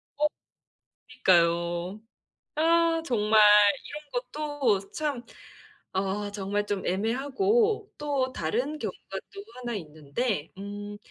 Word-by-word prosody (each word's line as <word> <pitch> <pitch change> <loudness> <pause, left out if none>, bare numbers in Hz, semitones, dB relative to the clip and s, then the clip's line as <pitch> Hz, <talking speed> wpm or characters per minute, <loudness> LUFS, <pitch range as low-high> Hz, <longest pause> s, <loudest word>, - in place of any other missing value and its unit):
어. 300 +1 +3 0.8
그니까요. 175 -4 +2 0.5
아 330 +1 +3
정말 215 -4 +3 0.5
이런 295 0 -9
것도 250 -6 -1
참 290 -5 -2 0.7
아 195 +2 -1
정말 205 +1 -2
좀 205 -2 -2
애매하고 335 - +1
또 280 -3 -1
다른 255 - -2
경우가 - - -5 0.2
또 400 0 -8
1 240 -2 -4
있는데 155 - -3
음 205 +1 -6
235 Hz, 175 characters per minute, -27 LUFS, 195-295 Hz, 0.8 s, 어